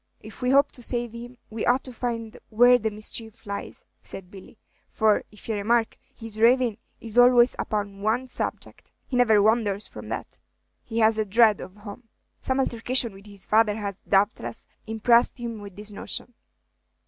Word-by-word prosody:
"If - - -12
we 250 - 0
hope 280 +2 +4
to 250 - -12
save 240 -1 0
him, 240 +2 -10
we 220 0 -4
ought 250 +2 +2
to 255 - -9
find 230 -1 -4
out - - -14
where 245 +3 +6
the 220 -1 -1
mischief 215 +1 -6
lies," 200 0 -7 0.2
said 185 -1 -10
Billy; 195 +3 -13 0.3
"for, 215 -1 +2
if 210 - -16
ye 225 - -1
remark, 225 +2 +1 0.2
his 225 -2 -5
ravin' 240 -1 +4 0.2
is 230 +1 -1
always 245 0 +6
upon 200 -2 -3
one 230 +5 0
subject; - - -5 0.2
he 255 - -5
never 230 -4 +5
wanders 215 -2 +1
from - - -10
that." - - -6 0.4
"He 225 - -6
has 220 0 +4
a - - +3
dread 215 0 +4
of 185 +2 -10
home. 210 +3 -11 0.3
Some 260 0 -1
altercation 240 -2 0
with 195 +2 -15
his 200 -2 -6
father 215 -1 +3
has, 200 -3 -5
doubtless, 195 - 0 0.2
impressed 235 +3 +3
him 230 -3 -5
with 200 -2 -10
this 210 +1 -7
notion." 245 +4 -4
225 Hz, 180 wpm, -25 LUFS, 210-240 Hz, 0.4 s, where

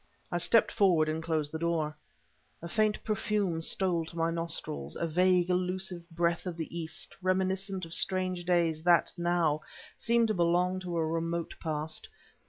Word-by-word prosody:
I 175 - 0
stepped 225 +6 +4
forward 180 -7 +3
and 155 +1 -1
closed 160 -2 -1
the 160 - -4
door. 160 -2 0 0.7
A - - -4
faint 215 +3 +1
perfume 210 -5 0
stole 175 0 +1
to 170 - -10
my 165 0 +1
nostrils 165 - -3
a - - -1
vague, 180 +2 +3
elusive 180 -1 -1
breath 170 +1 0
of 175 -2 -4
the 165 0 -5
East, 165 -2 -4
reminiscent 190 0 0
of 165 - -9
strange 185 -1 +1
days 170 -3 +2
that, 175 0 +4
now, 170 -3 +1 0.3
seemed 235 -1 +2
to - - +2
belong 180 +1 +2
to 175 -2 -4
a 165 - +1
remote 165 +1 -2
past. 155 -1 -3
170 Hz, 165 wpm, -30 LUFS, 165-185 Hz, 0.7 s, stepped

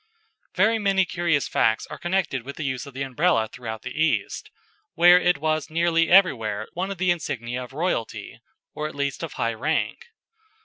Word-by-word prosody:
Very 225 +2 +3
many 195 -2 +2
curious 170 -5 0
facts 110 0 +1
are - - -7
connected 175 -7 -1
with 140 +4 -9
the 155 - -5
use 130 +1 -3
of 140 - -12
the 135 - -2
Umbrella 135 -2 +1
throughout 110 -2 -7
the - - -6
East, 160 - 0 0.5
where 175 +1 +7
it 175 -2 +2
was 155 +1 -1
nearly 165 0 +2
everywhere 115 - +3
one 185 +3 -3
of 195 - -5
the 185 0 +2
insignia 125 -6 -3
of 125 - -11
royalty, 150 -6 -3 0.3
or 150 - -3
at 155 - -10
least 140 -1 -2
of 165 -3 -5
high 115 0 -1
rank. 470 - -2
155 Hz, 180 wpm, -24 LUFS, 125-175 Hz, 0.5 s, where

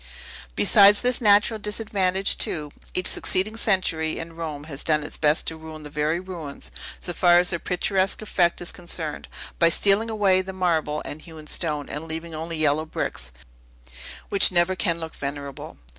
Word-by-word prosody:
Besides 200 - +6
this 250 0 +3
natural 210 +1 +4
disadvantage, 200 -3 0
too, 150 -3 -1 0.2
each 185 - -1
succeeding 205 +4 +2
century, 180 -7 0
in 165 0 -7
Rome, 155 -3 -6
has 150 -2 -4
done 150 -2 +1
its 150 - -7
best 150 0 +2
to 160 - -3
ruin 160 -1 -10
the 150 - -10
very 150 +3 0
ruins, 175 -6 -8 0.3
so 175 - -4
far 175 0 +5
as 180 0 +2
their 170 - -2
picturesque 190 +2 0
effect 180 -6 0
is 175 - -4
concerned, 160 -3 -4 0.3
by 170 - +5
stealing 205 +6 +3
away 200 -4 +2
the 190 +1 -7
marble 160 -5 -1
and 150 - -7
hewn 160 -2 -12
stone, 150 -2 -3
and 150 +3 -6
leaving 165 +1 -5
only 160 +1 -4
yellow 155 0 +1
bricks, 65 - -4 1.0
which 200 - +4
never 175 +1 +2
can 170 -2 0
look 160 -1 -6
venerable. 140 -1 -7
170 Hz, 170 wpm, -24 LUFS, 155-190 Hz, 1.0 s, Besides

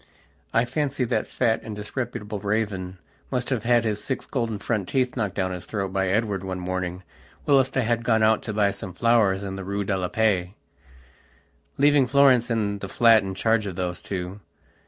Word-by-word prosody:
I 115 - +3
fancy 145 -1 -1
that 110 -3 -1
fat 115 -3 0
and 110 - -7
disreputable 105 -1 -5
raven 100 -3 -2 0.3
must 125 +1 -2
have 125 -4 0
had 120 -1 +4
his 105 -1 -1
six 130 - -3
golden 115 -5 -2
front 105 -2 -2
teeth 130 -2 0
knocked 105 -6 -2
down 95 -1 -1
his 90 -1 -6
throat 95 -3 -3
by 95 -1 +1
Edward 100 -1 0
one 95 -1 -4
morning 90 0 -3 0.4
whilst 135 -2 +3
I - - +4
had 115 0 0
gone 110 -2 +2
out 110 0 +4
to 110 - -5
buy 100 -1 +2
some 95 -1 -7
flowers 105 -2 +2
in 95 -1 -5
the 95 - -5
Rue 100 +2 -2
de 95 0 -1
la 90 -1 -1
Paix, 95 -3 0 1.2
leaving 145 -2 +4
Florence 130 -3 +4
and 105 -3 -1
the 100 - -6
flat 115 0 +5
in 95 0 -5
charge 110 +1 +1
of 95 - -5
those 90 -1 -3
two. 95 +1 -5
105 Hz, 195 wpm, -25 LUFS, 95-120 Hz, 1.2 s, flat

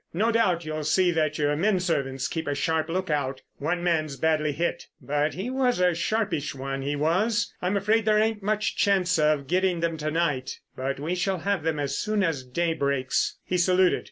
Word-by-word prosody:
No 220 +6 +2
doubt 185 -7 +1
you'll 155 0 -3
see 180 +4 +3
that 155 -2 0
your 150 0 +1
men 190 +4 +2
servants 140 -6 -1
keep 160 0 -4
a 145 - 0
sharp 160 +3 0
look 185 0 -2
out. 135 -3 -2 0.2
One 175 +4 -1
man's 155 -5 0
badly 155 +1 +1
hit—but 150 -1 -2
he 200 +8 -4
was 260 -5 +1
a 180 -1 +3
sharpish 170 -5 -1
one, 135 0 -4
he 140 +2 -2
was. 200 +9 +1
I'm 185 +3 0
afraid 210 +3 +2
there 215 -1 +4
ain't 215 0 +1
much 215 +1 0
chance 180 -4 +2
of 150 -2 +2
getting 180 +3 +1
them 165 -1 -1
to 155 0 -2
night, 150 -5 -1 0.2
but 135 +1 -3
we 155 +5 -2
shall 190 +1 0
have 200 -2 0
them 160 -1 -1
as 140 -1 -2
soon 210 -1 0
as 160 -7 -1
day 165 +7 -1
breaks." 140 -4 0
He 180 - -1
saluted. 180 +1 +3
165 Hz, 200 wpm, -26 LUFS, 145-190 Hz, 0.2 s, there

